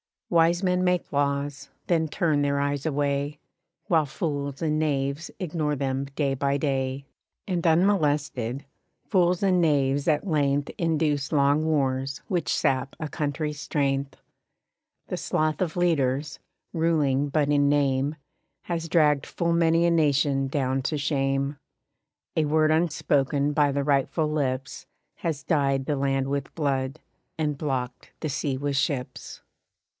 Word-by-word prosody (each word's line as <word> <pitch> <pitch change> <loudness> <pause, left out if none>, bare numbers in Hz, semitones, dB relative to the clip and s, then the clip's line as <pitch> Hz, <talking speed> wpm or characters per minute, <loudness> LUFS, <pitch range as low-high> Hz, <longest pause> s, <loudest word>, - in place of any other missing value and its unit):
Wise 170 +2 +3
men 180 -1 +2
make 180 -1 0
laws, 140 -1 -1 0.2
then 165 -2 +2
turn 155 -2 +1
their 140 0 +1
eyes 140 0 -1
away, 145 -1 -1 0.5
While 160 -3 +3
fools 140 -1 -3
and 155 -1 +1
knaves 140 0 -1
ignore 155 -5 -1
them 135 0 -2
day 140 0 -1
by 140 +1 0
day; 135 -1 -1 0.4
And 175 -3 0
unmolested, 145 - +1 0.4
fools 180 -2 +2
and 185 -2 +3
knaves 140 -3 +2
at 155 +3 +2
length 145 -4 +1
Induce 155 -3 0
long 145 +1 +3
wars 135 -3 0
which 180 -4 -1
sap 135 0 0
a 155 - -4
country's 150 0 -3
strength. 140 -2 -1 0.9
The - - -3
sloth 155 +2 -1
of 170 -4 -1
leaders, 150 -4 0 0.3
ruling 150 -5 +1
but 145 0 +1
in 145 -1 +3
name, 140 0 +1 0.5
Has 165 -1 -3
dragged 150 -4 +3
full 170 -1 -1
many 165 0 +3
a 170 - +3
nation 140 -4 +2
down 135 -1 0
to 150 - -1
shame. 140 -1 0 0.8
A 155 - +3
word 155 +1 +3
unspoken 145 -3 +1
by 145 -1 +3
the 140 0 0
rightful 145 +2 +1
lips 135 -3 -2 0.3
Has 155 -4 -3
dyed 140 -4 +1
the 145 0 -1
land 135 -1 0
with 140 -1 -3
blood, 135 -2 -1 0.4
and 150 -2 0
blocked 130 -4 -4
the 155 - -2
sea 140 -1 -2
with 140 0 -2
ships. 140 -3 -3
145 Hz, 140 wpm, -26 LUFS, 140-160 Hz, 0.9 s, Wise